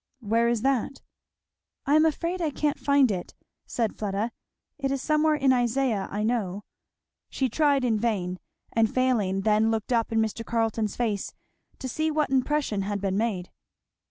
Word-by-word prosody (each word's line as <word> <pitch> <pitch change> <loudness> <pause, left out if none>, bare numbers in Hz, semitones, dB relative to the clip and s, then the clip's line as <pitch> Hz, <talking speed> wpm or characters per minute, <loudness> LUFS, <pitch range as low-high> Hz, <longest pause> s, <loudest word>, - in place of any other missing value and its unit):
'" - - -51
"Where 230 0 +1
is 235 -2 0
that?" 270 0 0 0.8
"I 285 - +2
am 310 +1 +6
afraid 340 +3 -2
I 320 - +1
can't 295 0 -1
find 280 -4 +4
it," 180 -3 -5 0.3
said 230 -3 -1
Fleda, 210 +2 -2 0.5
"it 275 -1 -1
is 275 0 -1
somewhere 305 +2 +2
in 270 -3 +3
Isaiah, 245 -4 +1
I 205 +1 -2
know" 210 -4 -1 0.7
She 265 -2 -1
tried 285 0 +2
in 225 -3 +1
vain; 185 -5 -1 0.3
and 225 -1 +2
failing, 220 -7 +1
then 215 +2 +3
looked 225 +2 -1
up 230 -1 +1
in 225 - 0
Mr. 220 +1 -1
Carleton's 225 -2 -1
face 215 -5 -2 0.4
to 265 - -5
see 315 +5 -1
what 300 -2 0
impression 265 -5 +1
had 200 +1 -2
been 195 -1 -1
made. 200 -4 -1
235 Hz, 170 wpm, -26 LUFS, 210-275 Hz, 0.8 s, am